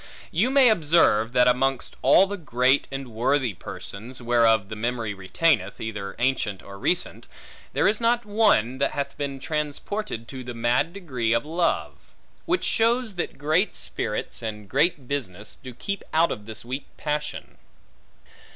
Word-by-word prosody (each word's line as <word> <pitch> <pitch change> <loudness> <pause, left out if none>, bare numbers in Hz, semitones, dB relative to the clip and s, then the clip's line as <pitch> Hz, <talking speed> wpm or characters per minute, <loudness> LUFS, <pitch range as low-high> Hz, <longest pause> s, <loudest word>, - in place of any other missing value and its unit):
You 200 +10 +2
may 270 -2 +6
observe, 150 - +3
that 125 -1 +5
amongst 130 +1 +1
all 140 +8 +6
the 200 +1 -4
great 135 -5 +2
and 135 -1 -5
worthy 125 +1 +1
persons 115 +7 -8
(whereof 115 -4 +3
the 110 - -6
memory 115 -1 -2
remaineth, 100 - +1
either 100 -3 -5
ancient 120 -7 0
or 100 0 -10
recent) 180 - -1 0.5
there - - +3
is 215 +2 +1
not 235 0 +2
one, 205 - +3
that 140 - +1
hath 140 0 -3
been 140 -2 -4
transported 150 - -3
to 130 -1 -7
the 120 -1 -7
mad 120 +7 +1
degree 130 - -1
of 115 - +1
love: 170 +2 0 0.5
which 355 +2 +1
shows 230 0 +2
that 175 -6 -4
great 155 +8 +1
spirits, 105 +2 -4
and 105 -2 -5
great 140 - +1
business, 105 -8 -4
do 130 - -7
keep 200 +11 -4
out 160 -10 +2
this 110 0 -6
weak 130 +3 -5
passion. 150 0 -4
135 Hz, 150 wpm, -25 LUFS, 115-165 Hz, 0.5 s, may